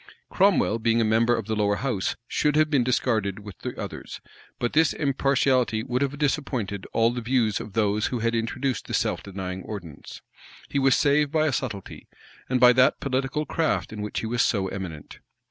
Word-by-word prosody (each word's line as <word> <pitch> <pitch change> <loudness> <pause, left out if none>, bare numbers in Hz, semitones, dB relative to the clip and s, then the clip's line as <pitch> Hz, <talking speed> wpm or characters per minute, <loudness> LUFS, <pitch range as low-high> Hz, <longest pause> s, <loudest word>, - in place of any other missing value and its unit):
[] - - -44
Cromwell, 190 - +3
being 115 +1 +2
a - - +3
member 115 +2 +3
of 115 - -4
the 110 - -2
lower 105 -1 +1
house, 115 -6 -2
should 150 -1 +1
have 155 0 +3
been 135 -4 +3
discarded 110 -5 0
with 100 -2 -11
the - - -6
others; - - -7 0.4
but 120 - -2
this 160 0 +4
impartiality 135 -5 +1
would 125 +2 -2
have 140 0 -1
disappointed 130 - -2
all 115 +1 +3
the 120 0 -4
views 115 -3 +1
of 105 - -8
those 105 -1 +1
who 125 - -2
had 115 0 0
introduced 125 +3 -2
the - - -2
self - - 0
denying 95 -1 -6
ordinance. 90 -8 -9 0.5
He 140 - 0
was 135 -1 +4
saved 145 0 +2
by 155 -1 +2
a 150 - +1
subtlety, 110 -7 -5 0.4
and 130 0 +1
by 125 0 +7
that 130 +1 +4
political 135 +3 -1
craft 160 -9 -1
in 105 - -6
which 105 - -3
he - - -4
was 120 +2 0
so 95 -4 +1
eminent. 90 -6 -7
120 Hz, 195 wpm, -25 LUFS, 105-135 Hz, 0.5 s, by